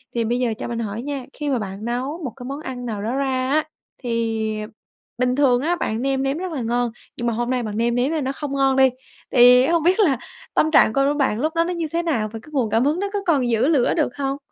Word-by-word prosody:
thì 235 - +1
bây 240 +2 0
giờ 240 -3 0
cho - - -5
mình 235 -1 -3
hỏi 220 0 -3
nha, 275 -1 -4
khi 295 -1 -4
mà 260 -4 +1
bạn 195 +1 -6
nấu 260 +8 -3
một 255 - -3
cái 250 -2 -9
món 275 +3 -5
ăn 255 -4 -6
nào 215 -4 -4
đó 230 +5 -2
ra 265 -2 0
á, 305 +2 +2 0.3
thì 225 -3 -2 0.6
bình 250 0 +1
thường 255 -3 +3
á 335 +5 +1
bạn 225 -9 -2
nêm 270 0 0
nếm 275 +3 0
rất 370 0 -4
là 290 -5 -3
ngon, 240 +1 0 0.3
nhưng 240 - -2
mà 235 - +1
hôm 240 +2 -2
nay 255 -1 0
bạn 210 -2 -4
nêm 235 +1 +1
nếm 250 +4 +1
n 315 -3 -1
nó 265 - -1
không 280 0 -5
ngon 270 -1 +2
đi, 265 0 +6 0.4
thì 250 +1 +7
hông 335 -1 +2
biết 365 +5 +3
là 310 - +4 0.4
tâm 315 - +2
trạng 285 - +6
c - - -10
của 275 +1 +3
bạn 260 -7 +1
lúc 310 +5 -1
đó 335 - +3
nó 355 +2 -2
như 335 -2 -2
thế 340 +1 0
nào? 240 -11 0
Và 225 - -5
cái - - -15
nguồn 260 -7 0
cảm 225 +4 +2
hứng 300 +5 +1
nó 400 +1 -1
có 410 - 0
còn 275 -8 +2
giữ 230 +2 +2
lửa 290 -6 +3
được 305 -7 0
hông? 275 -1 -2
260 Hz, 280 wpm, -22 LUFS, 235-290 Hz, 0.6 s, thì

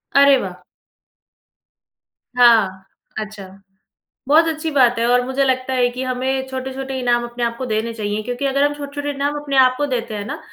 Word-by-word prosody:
अरे, 280 -1 +7
वाह! 180 -5 -6 1.7
हाँ, 210 -6 +4 0.3
अच्छा। 210 -2 -7 0.8
बहुत 320 +3 +5
अच्छी 320 0 -2
बात 245 -4 +3
है 230 - +1
और 245 0 +4
मुझे 265 +2 0
लगता 260 0 0
है 250 -1 +3
कि 250 +2 -5
हमें 260 +1 -2
छोट-छोटे 265 0 -5
इनाम 240 -1 +1
अपने 240 0 -5
आप 235 0 -1
को 255 - -4
देने 225 0 -2
चाहिए, 210 -1 -3
क्योंकि 245 +4 -4
अगर 275 +1 +1
हम 290 0 +2
छोट-छोटे 290 0 -5
इनाम 285 +1 -2
अपने 280 -2 -2
आप 255 -1 +5
को 290 - 0
देते 235 -4 -3
हैं 205 - -5
ना, - - -6
255 Hz, 180 wpm, -19 LUFS, 235-275 Hz, 1.7 s, अरे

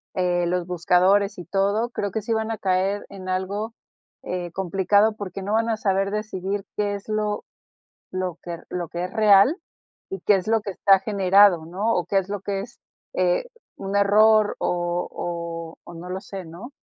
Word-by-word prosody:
eh, 175 -1 +1
los 180 0 -1
buscadores 185 +3 +2
y 175 - -8
todo, 200 +5 0
creo 205 -4 -3
que 220 - -2
sí 225 +2 -2
van 220 0 -1
a 225 - -3
caer 190 +2 0
en 190 -2 -8
algo 200 +4 -2 0.5
eh, 175 -1 -4
complicado, 195 +3 +2
porque 195 -1 -6
no 205 +2 -2
van 225 +1 +2
a 220 - 0
saber 195 -1 0
decidir 205 -2 -3
qué 205 -1 0
es 200 +2 -10
lo 210 -1 -1 0.7
lo 185 -2 -3
que 170 -1 -5
re - - -16
lo - - -3
lo - - -15
que 175 0 -4
es - - -7
real 215 - +6 0.5
y 195 - -5
qué 210 - +4
es 185 0 -2
lo 225 -1 +2
que 200 - -5
está 195 +1 +4
generado, 195 -4 +4
¿no? 200 +7 -1
O 175 - 0
qué 195 - 0
es 190 0 -6
lo 205 -1 -3
que 195 -1 -2
es, 235 - -11 0.4
eh, - - +1 0.3
un 195 +1 -4
error 210 +1 +5
o 175 0 -1
o 170 -1 -5
o - - -11
no 175 +2 -9
lo 190 +1 -4
sé, 190 -3 -8
¿no? 180 - -10
195 Hz, 200 wpm, -24 LUFS, 180-210 Hz, 0.7 s, real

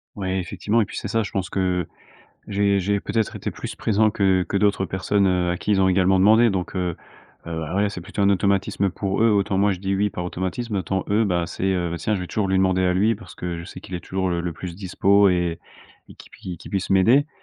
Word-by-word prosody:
Ouais 95 -2 -2
effectivement 105 +5 -1
et - - +1
puis - - -10
c'est 100 - -4
ça 115 0 +1
je - - -7
pense 95 -2 -2
que 90 -2 -1 0.6
j'ai 100 0 +2
j'ai 100 +2 0
peut-être 110 +2 -2
été - - -4
plus - - -7
présent 110 0 +2
que 95 -3 +2
que 100 - +1
d'autres 100 -1 +2
personnes, 95 +2 +1
heu, 90 -1 +1
à 90 - -2
qui - - -6
ils 95 - +3
ont 95 - +4
également 95 0 +3
demandé 110 +4 +6
donc, 95 -1 -3
heu 90 -2 -1 0.5
heu, 80 -1 -4
bah, 80 +3 -4
ouais 100 +1 +2
c'est 95 -3 -7
plutôt 100 +3 -3
un 100 - +4
automatisme 100 0 +1
pour 95 +2 -2
eux. 115 - +5
Autant 100 -1 +1
moi 100 0 +3
je 90 - -8
dis 95 0 -2
«oui» 105 +1 +1
par 90 - -5
automatisme, 95 +6 -3
autant 95 0 -2
eux 110 +2 +3
bah 90 -4 0
c'est, 95 - -4
heu,: 90 -2 -1
«Bah 85 - -3
tiens 105 - -1
je 95 - -3
vais 90 - -5
toujours 100 0 -1
lui 95 0 +1
demander 95 -1 +2
à 90 0 +2
lui 105 +5 +3
parce 110 0 -12
que 85 -1 -4
je - - -7
sais 95 - -10
qu'il 95 - -11
est 90 - -2
toujours 95 0 -2
le 85 -1 -1
le 85 -2 -3
plus 85 0 -7
dispo 100 +1 +3
et 90 -2 0 0.5
et - - -13
qu'il - - -16
pui 90 -3 -8
qu'il - - -12
puisse 95 -2 -2
m'aider». 115 +10 +4
95 Hz, 260 wpm, -23 LUFS, 90-100 Hz, 0.6 s, demandé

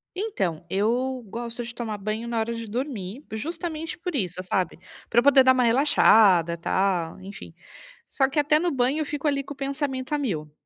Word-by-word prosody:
Então, 360 - -2
eu 245 +6 0
gosto 235 +3 -5
de 240 +1 -7
tomar 225 -3 -4
banho 215 +3 -4
na 235 -1 -1
hora 225 +1 -1
de 230 -1 -6
dormir, 235 -1 -4
justamente 320 +6 -4
por 345 -1 -5
isso, 185 -7 -1
sabe, 180 -3 -1 0.3
para 235 - +4
eu - - +2
poder 275 -2 +7
dar 260 - +6
uma 255 -1 +2
relaxada 220 - +5
e - - -5
tal, 175 -1 0
enfim. 195 +2 -10 0.5
Só 270 - +1
que 275 - 0
até 300 +1 +4
no 350 +1 0
banho 265 +2 +1
eu 310 - -1
fico, 295 +1 -3
ali, 275 -1 +1
com 285 - -8
o - - -22
pensamento 275 0 -3
a - - +2
1000, 165 - -3
245 Hz, 205 wpm, -25 LUFS, 205-285 Hz, 0.5 s, poder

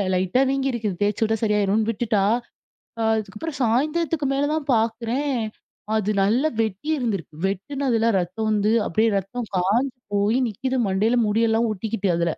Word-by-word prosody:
லைட்டா 185 +8 +2
வீங்கியிருக்குது. 240 -8 -1
தேச்சு 205 +1 0
விட்டா 220 0 +1
சரியாயிருன்னு 210 +1 +2
விட்டுட்டா, 215 -2 0 0.8
அ - - +1
அதுக்கப்பறம் 220 +9 -5
சாயந்தரத்துக்கு 300 +6 +1
மேல 280 +1 +1
தான் 305 -2 -3
பாக்குறேன். 235 +5 0 0.6
அது 210 -1 0
நல்லா 235 +10 +2
வெட்டி 215 +6 -4
இருந்திருக்கு. 200 - -3
வெட்டுனதில 230 +3 -1
ரத்தம் 200 +5 -3
வந்து, 210 0 +2 0.2
அப்பிடியே 220 +6 +2
ரத்தம் 220 +5 -5
காஞ்சு 235 +9 +1 0.2
போயி 205 +4 +2
நிக்கிது 260 +5 -2
மண்டையில 210 +5 +2
முடியெல்லாம் 225 +2 +2
ஒட்டிக்கிட்டு 205 0 -2
அதுல. 170 -1 +1
225 Hz, 135 wpm, -23 LUFS, 205-255 Hz, 0.8 s, லைட்டா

